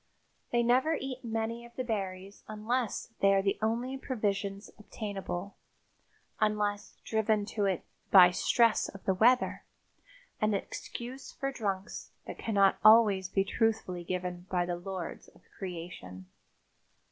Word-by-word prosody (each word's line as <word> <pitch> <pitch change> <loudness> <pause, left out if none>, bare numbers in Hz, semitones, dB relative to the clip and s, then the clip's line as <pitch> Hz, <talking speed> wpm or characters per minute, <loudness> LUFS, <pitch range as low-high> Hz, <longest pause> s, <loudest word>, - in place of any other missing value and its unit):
They 240 0 +3
never 260 +7 +3
eat 265 -1 -6
many 225 0 -3
of 235 0 -15
the 255 - -2
berries 195 -4 -4
unless 225 +2 -2
they 195 0 +5
are 195 - +2
the 195 - 0
only 240 +4 -1
provisions 200 -5 -2
obtainable, 200 -3 -5 0.8
unless 210 -1 0
driven 220 -1 +1
to 205 -2 +1
it 190 -3 0 0.3
by 180 -2 +9
stress 230 +5 +3
of 195 - -11
the 190 - +3
weather, 240 +6 +3 0.8
an 215 -1 +2
excuse 245 +6 -6
for 275 0 -3
drunks 200 -6 -4
that - - -8
cannot 200 -3 +3
always 210 -4 +6
be 195 +1 +2
truthfully 215 -4 -1
given 180 0 -4
by 180 -1 +1
the 175 0 -2
lords 180 -1 -6
of - - -21 0.2
creation. 165 - -7
205 Hz, 135 wpm, -30 LUFS, 190-230 Hz, 0.8 s, by